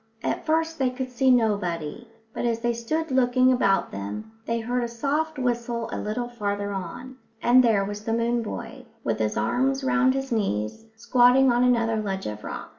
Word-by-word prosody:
At -, -, -2 dB
first 320 Hz, 0 st, 0 dB
they 260 Hz, -1 st, +2 dB
could 255 Hz, 0 st, -5 dB
see 260 Hz, +1 st, +2 dB
nobody, 205 Hz, -4 st, 0 dB, 0.3 s
but -, -, -4 dB
as 230 Hz, -1 st, 0 dB
they 240 Hz, 0 st, +1 dB
stood 310 Hz, +7 st, -2 dB
looking 255 Hz, 0 st, +4 dB
about 195 Hz, -6 st, +2 dB
them 100 Hz, -, -6 dB, 0.2 s
they 230 Hz, 0 st, 0 dB
heard 245 Hz, +2 st, -1 dB
a -, -, -1 dB
soft 290 Hz, +6 st, -2 dB
whistle 240 Hz, -2 st, -2 dB
a -, -, -3 dB
little 240 Hz, +3 st, -3 dB
farther 205 Hz, -3 st, -3 dB
on; 250 Hz, +7 st, -7 dB, 0.2 s
and 250 Hz, +2 st, +5 dB
there 215 Hz, -5 st, +3 dB
was 205 Hz, +1 st, -6 dB
the 225 Hz, -, -1 dB
moon 235 Hz, +1 st, +1 dB
boy, 220 Hz, -, -7 dB, 0.2 s
with -, -, -1 dB
his 110 Hz, -1 st, -1 dB
arms 265 Hz, -, +1 dB
round 260 Hz, 0 st, +3 dB
his 270 Hz, -1 st, -3 dB
knees, 195 Hz, -, -1 dB
squatting 245 Hz, +3 st, +4 dB
on 240 Hz, +1 st, +3 dB
another 230 Hz, -3 st, +2 dB
ledge 195 Hz, -3 st, -3 dB
of 105 Hz, -1 st, -5 dB
rock. -, -, -6 dB
235 Hz, 190 wpm, -25 LUFS, 210-255 Hz, 0.3 s, and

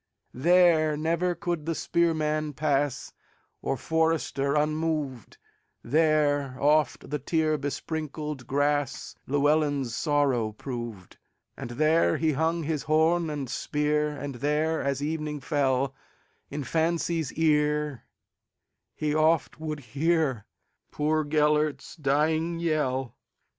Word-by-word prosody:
There 160 Hz, +1 st, +4 dB
never 170 Hz, +3 st, 0 dB
could 170 Hz, -2 st, -3 dB
the 165 Hz, -, 0 dB
spearman 155 Hz, -3 st, 0 dB
pass, 140 Hz, -2 st, -1 dB, 0.5 s
Or 135 Hz, -, -1 dB
forester, 160 Hz, -2 st, 0 dB
unmoved; 150 Hz, -, -1 dB, 0.5 s
There 145 Hz, -2 st, +2 dB
oft 150 Hz, -2 st, +2 dB
the 150 Hz, -, -1 dB
tear 155 Hz, +2 st, +1 dB
besprinkled 150 Hz, -1 st, -4 dB
grassLlewelyn's 145 Hz, -1 st, 0 dB
sorrow 135 Hz, -8 st, +1 dB
proved. 120 Hz, -6 st, -7 dB, 0.4 s
And -, -, -7 dB
there 155 Hz, -, +2 dB
he 160 Hz, -1 st, +1 dB
hung 160 Hz, +3 st, 0 dB
his 155 Hz, -1 st, -1 dB
horn 160 Hz, +2 st, +2 dB
and 145 Hz, -3 st, -4 dB
spear, 150 Hz, +4 st, 0 dB
And 140 Hz, -1 st, -5 dB
there, 150 Hz, +5 st, 0 dB
as 140 Hz, 0 st, -1 dB
evening 150 Hz, -1 st, -3 dB
fell, 135 Hz, -2 st, 0 dB, 0.6 s
In 145 Hz, +1 st, -4 dB
fancy's 165 Hz, 0 st, 0 dB
ear 150 Hz, -3 st, +1 dB, 0.9 s
he 150 Hz, -1 st, -1 dB
oft 155 Hz, -2 st, +2 dB
would 155 Hz, -2 st, -4 dB
hearPoor 155 Hz, -5 st, +1 dB, 0.9 s
Gêlert's 150 Hz, 0 st, +1 dB
dying 155 Hz, +3 st, +1 dB
yell. 135 Hz, -7 st, -1 dB
150 Hz, 100 wpm, -27 LUFS, 140-160 Hz, 0.9 s, There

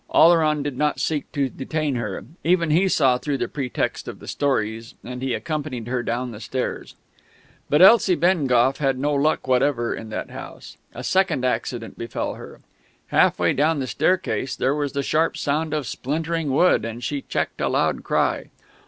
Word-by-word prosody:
Oleron 155 Hz, -3 st, +4 dB
did 140 Hz, -3 st, -4 dB
not 150 Hz, 0 st, +1 dB
seek 150 Hz, -3 st, -2 dB
to 140 Hz, -2 st, 0 dB
detain 150 Hz, +3 st, -3 dB
her; 105 Hz, -6 st, -4 dB, 0.2 s
even 170 Hz, -2 st, +2 dB
he 180 Hz, +5 st, +4 dB
saw 130 Hz, -8 st, +3 dB
through 140 Hz, +2 st, -2 dB
the -, -, -2 dB
pretext 135 Hz, -4 st, -3 dB
of -, -, -6 dB
the -, -, -13 dB
stories; 115 Hz, -5 st, -1 dB
and 125 Hz, +1 st, -7 dB
he 130 Hz, -2 st, -1 dB
accompanied 150 Hz, -7 st, -4 dB
her 125 Hz, 0 st, -1 dB
down 120 Hz, +1 st, -2 dB
the 105 Hz, -, -9 dB
stairs. 125 Hz, +3 st, -4 dB, 0.7 s
But 150 Hz, +5 st, +5 dB
Elsie 195 Hz, -2 st, +7 dB
Bengough 135 Hz, -8 st, +2 dB
had 135 Hz, -3 st, +1 dB
no 145 Hz, +3 st, 0 dB
luck 145 Hz, 0 st, +1 dB
whatever 125 Hz, -2 st, +1 dB
in 110 Hz, -, -7 dB
that 110 Hz, -, -5 dB
house. -, -, -10 dB, 0.2 s
A -, -, -6 dB
second 185 Hz, -9 st, +1 dB
accident 120 Hz, -2 st, -3 dB
befell 115 Hz, -, -3 dB
her. -, -, -11 dB, 0.5 s
Half -, -, +3 dB
way -, -, +2 dB
down 155 Hz, +3 st, +2 dB
the 135 Hz, -, -2 dB
staircase 180 Hz, -3 st, 0 dB
there 130 Hz, +2 st, +1 dB
was 145 Hz, -1 st, -2 dB
the 140 Hz, 0 st, -1 dB
sharp 160 Hz, +3 st, +1 dB
sound 155 Hz, 0 st, -1 dB
of 150 Hz, -3 st, -1 dB
splintering 160 Hz, +6 st, -2 dB
wood, 140 Hz, -4 st, +3 dB
and 115 Hz, +1 st, -6 dB
she 145 Hz, -2 st, -2 dB
checked -, -, -3 dB
a -, -, +1 dB
loud -, -, 0 dB
cry. -, -, 0 dB
140 Hz, 180 wpm, -23 LUFS, 125-155 Hz, 0.7 s, Elsie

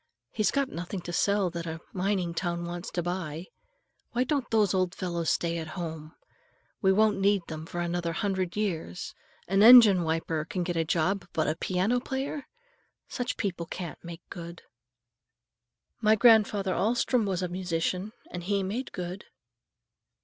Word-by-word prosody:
He's 215 Hz, -, +1 dB
got 280 Hz, -1 st, +1 dB
nothing 180 Hz, 0 st, -5 dB
to 175 Hz, 0 st, -6 dB
sell 200 Hz, 0 st, +2 dB
that 170 Hz, -1 st, -5 dB
a 160 Hz, 0 st, -4 dB
mining 185 Hz, -2 st, 0 dB
town 170 Hz, 0 st, -2 dB
wants 175 Hz, +1 st, -5 dB
to 175 Hz, -, -2 dB
buy. 175 Hz, -2 st, -4 dB, 0.7 s
Why 245 Hz, +1 st, +2 dB
don't 275 Hz, -2 st, -1 dB
those 210 Hz, -4 st, +3 dB
old 185 Hz, -1 st, 0 dB
fellows 170 Hz, -3 st, -2 dB
stay 170 Hz, 0 st, 0 dB
at 160 Hz, -, -5 dB
home? 160 Hz, -2 st, -6 dB, 0.7 s
We 190 Hz, -, +4 dB
won't 210 Hz, +1 st, +3 dB
need 200 Hz, -1 st, +3 dB
them 160 Hz, 0 st, -7 dB
for 175 Hz, -, -4 dB
another 175 Hz, 0 st, -1 dB
hundred 190 Hz, -1 st, -1 dB
years. 180 Hz, -4 st, -3 dB, 0.3 s
An 195 Hz, +2 st, +3 dB
engine 220 Hz, -5 st, +9 dB
wiper 160 Hz, -1 st, -1 dB
can 180 Hz, +3 st, -3 dB
get 175 Hz, 0 st, -2 dB
a 165 Hz, -, +2 dB
job, 175 Hz, +3 st, 0 dB
but 155 Hz, -, +1 dB
a 155 Hz, -, 0 dB
piano 185 Hz, +8 st, 0 dB
player! 270 Hz, +3 st, -4 dB, 0.6 s
Such 245 Hz, 0 st, -3 dB
people 175 Hz, -5 st, -3 dB
can't 175 Hz, -2 st, -7 dB
make 170 Hz, -1 st, -8 dB
good." 170 Hz, 0 st, -8 dB, 1.4 s
"My 215 Hz, 0 st, +5 dB
grandfather 210 Hz, -4 st, +4 dB
Alstrom 235 Hz, +1 st, +1 dB
was 185 Hz, -1 st, -1 dB
a -, -, 0 dB
musician, 180 Hz, +2 st, -2 dB, 0.2 s
and 180 Hz, -, -5 dB
he 200 Hz, 0 st, +1 dB
made 220 Hz, +8 st, -3 dB
good." 180 Hz, +1 st, -5 dB
185 Hz, 160 wpm, -28 LUFS, 170-205 Hz, 1.4 s, engine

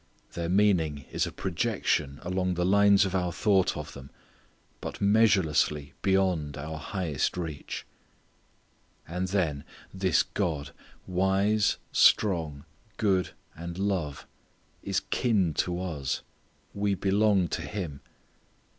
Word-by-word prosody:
Their 85 Hz, -1 st, -3 dB
meaning 85 Hz, -8 st, +2 dB
is -, -, 0 dB
a -, -, -6 dB
projection 90 Hz, -7 st, -1 dB
along 90 Hz, 0 st, -1 dB
the 90 Hz, 0 st, 0 dB
lines 100 Hz, +1 st, +5 dB
of 95 Hz, -, -3 dB
our 90 Hz, -2 st, 0 dB
thought 95 Hz, -4 st, +2 dB
of 75 Hz, -1 st, -7 dB
them, 70 Hz, 0 st, -11 dB, 0.7 s
but -, -, -6 dB
measurelessly 95 Hz, -9 st, +3 dB
beyond 95 Hz, -7 st, +1 dB
our 80 Hz, +2 st, -5 dB
highest 85 Hz, -2 st, -2 dB
reach. 80 Hz, -5 st, -5 dB, 1.2 s
And 90 Hz, +3 st, -2 dB
then, 85 Hz, -7 st, 0 dB, 0.3 s
this 95 Hz, -3 st, +2 dB
God, 75 Hz, -5 st, -2 dB, 0.3 s
wise, 95 Hz, +3 st, +2 dB
strong, 80 Hz, -8 st, +3 dB, 0.3 s
good, 95 Hz, -4 st, +1 dB, 0.2 s
and 85 Hz, +1 st, -7 dB
love, 95 Hz, -8 st, -2 dB, 0.6 s
is 100 Hz, -1 st, -1 dB
kin 100 Hz, -10 st, +2 dB
to 90 Hz, 0 st, 0 dB
us. 80 Hz, -7 st, -3 dB, 0.5 s
We 100 Hz, -1 st, 0 dB
belong 100 Hz, -1 st, +2 dB
to -, -, -2 dB
Him. 90 Hz, -9 st, -5 dB
90 Hz, 115 wpm, -28 LUFS, 80-100 Hz, 1.2 s, lines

